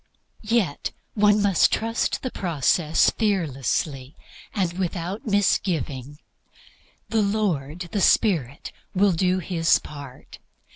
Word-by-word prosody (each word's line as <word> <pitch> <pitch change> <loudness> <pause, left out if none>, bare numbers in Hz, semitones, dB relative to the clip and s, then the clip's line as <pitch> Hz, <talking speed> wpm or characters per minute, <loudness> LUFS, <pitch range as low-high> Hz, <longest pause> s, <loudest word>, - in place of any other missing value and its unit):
Yet 215 -9 0 0.2
must 210 -1 +3
one 200 -1 +2 0.3
trust 225 +1 -1
the 255 - -3
process 165 -1 +2
fearlessly 145 - -1 0.4
and 185 -5 -1
without 185 +3 -4
misgiving. 150 - 0 0.9
"The 225 -1 +2
Lord 180 -7 -1
the 205 - -1
Spirit" 150 - +2 0.2
will 200 +1 +4
do 185 +2 +1
His 170 -2 +2
part. 140 -4 -11
180 Hz, 100 wpm, -24 LUFS, 145-205 Hz, 0.9 s, will